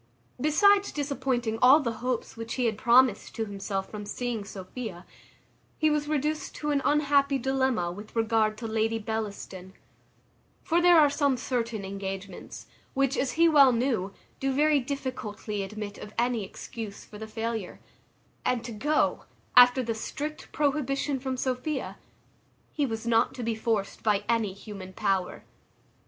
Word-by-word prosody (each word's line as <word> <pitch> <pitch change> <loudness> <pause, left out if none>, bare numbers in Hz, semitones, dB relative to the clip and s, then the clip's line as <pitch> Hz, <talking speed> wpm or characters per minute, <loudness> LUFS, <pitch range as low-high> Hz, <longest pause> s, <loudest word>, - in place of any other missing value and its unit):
Besides 400 +7 +4
disappointing 260 -6 -1
all 265 +5 +8
the 235 -6 -3
hopes 250 -2 -2
which 230 0 -5
he 245 -3 +2
promised 235 +1 +3
to 225 - -1
himself 195 -1 -4
from 210 -1 -6
seeing 240 -2 -3
Sophia, 195 -1 -7 0.7
he 310 -1 +3
was 300 -1 0
reduced 305 +1 -1
to 300 0 -2
an 280 -1 +2
unhappy 285 -1 +3
dilemma, 260 -8 0
with 205 +5 -10
regard 225 -1 +2
to 230 - -5
Lady 225 +1 0
Bellaston; 205 -4 -5 0.9
for 340 +1 +2
there 350 -1 +7
are 295 -2 +5
some 285 -3 +2
certain 235 -4 -2
engagements, 195 -1 -6 0.3
which, 275 0 +2
as 255 -2 0
he 335 +1 +5
well 285 -5 +7
knew, 235 -5 0 0.3
do 270 0 0
very 295 +2 +3
difficultly 245 -6 -4
admit 205 +1 -6
of 210 - -10
any 240 -2 +1
excuse 205 +2 -8
for 210 - -12
the 220 - -6
failure; 225 -3 -4 0.6
and 245 -2 0
to 240 - -5
go, 295 +8 0 0.3
after 250 +1 +8
the 230 -1 -1
strict 295 +7 -6
prohibition 280 -1 0
from 260 0 -3
Sophia, 260 +3 -2 0.7
he 290 -3 0
was 225 -1 -4
not 230 -1 +2
to 250 - -5
be 230 0 0
forced 220 -3 -2
by 210 -2 +2
any 225 -4 +1
human 195 -2 -9
power. 190 -1 -1
235 Hz, 150 wpm, -28 LUFS, 215-275 Hz, 0.9 s, all